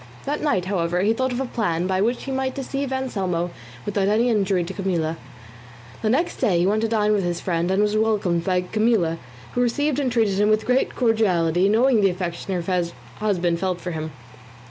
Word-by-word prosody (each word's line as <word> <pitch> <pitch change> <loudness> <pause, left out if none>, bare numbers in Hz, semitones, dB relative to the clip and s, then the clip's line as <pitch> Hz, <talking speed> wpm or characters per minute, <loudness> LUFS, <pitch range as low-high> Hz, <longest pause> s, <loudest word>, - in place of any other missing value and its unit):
That 290 +2 -2
night, 195 -12 +1
however, 180 -2 0
he 210 +3 +3
thought 260 +2 -1
of 245 - -2
a 270 - -1
plan 180 -9 -1
by 190 0 0
which 235 +4 0
he 270 - -5
might 265 0 -1
deceive 275 0 -3
Anselmo 190 -10 -2 0.3
without 200 -1 0
any 225 +4 +3
injury 195 -4 +1
to 180 +3 -6
Camilla. 175 -5 -1 0.9
The 215 - +1
next 290 +9 +1
day 180 -4 +2
he 175 - +2
went 210 +3 +2
to 225 - +1
dine 215 -1 +2
with 200 -2 +1
his 175 -1 -1
friend, 170 -1 -1
and 190 +2 +2
was 210 0 +1
welcomed 210 -6 +1
by 180 0 +1
Camilla, 185 -4 +1 0.3
who 245 - +1
received 290 +4 +1
and 265 -3 0
treated 220 -5 +1
him 210 +1 +3
with 215 0 +2
great 255 +1 +1
cordiality, 190 -7 +2
knowing 230 +1 +4
the 195 - +4
affection 180 +1 -3
her 180 +1 0 0.4
husband 180 -5 0
felt 185 -1 -1
for 180 - -5
him. 155 -1 -4
200 Hz, 205 wpm, -23 LUFS, 180-230 Hz, 0.9 s, knowing